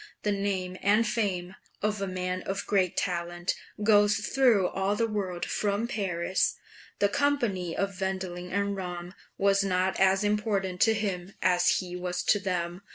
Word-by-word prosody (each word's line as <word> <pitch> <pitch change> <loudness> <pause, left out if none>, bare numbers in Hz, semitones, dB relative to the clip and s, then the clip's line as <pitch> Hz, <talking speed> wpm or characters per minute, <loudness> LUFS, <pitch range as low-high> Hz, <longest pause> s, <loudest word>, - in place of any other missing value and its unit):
The 210 - +1
name 195 -2 -2
and 210 +3 +4
fame 190 -5 -1 0.3
of 210 -1 0
a 195 - -1
man 185 0 -2
of 195 +2 -3
great 190 -4 +1
talent 175 -1 -1 0.3
goes 205 -1 +5
through 225 -4 +3
all 195 +1 0
the 230 - +1
world 195 -5 -3
from 205 +2 -1
Paris." 190 -4 0 0.4
The 200 - +3
company 205 - 0
of 195 -1 -2
Wendling 185 -2 -3
and 200 +1 0
Ramm 180 -1 -6 0.2
was 200 0 +3
not 185 -1 0
as 190 +1 +4
important 205 -3 0
to 225 -1 +5
him 195 -3 -3
as 180 -1 +4
his 180 -1 -6
was 180 0 -2
to 205 - +3
them. 180 -2 -2
195 Hz, 160 wpm, -28 LUFS, 180-205 Hz, 0.4 s, goes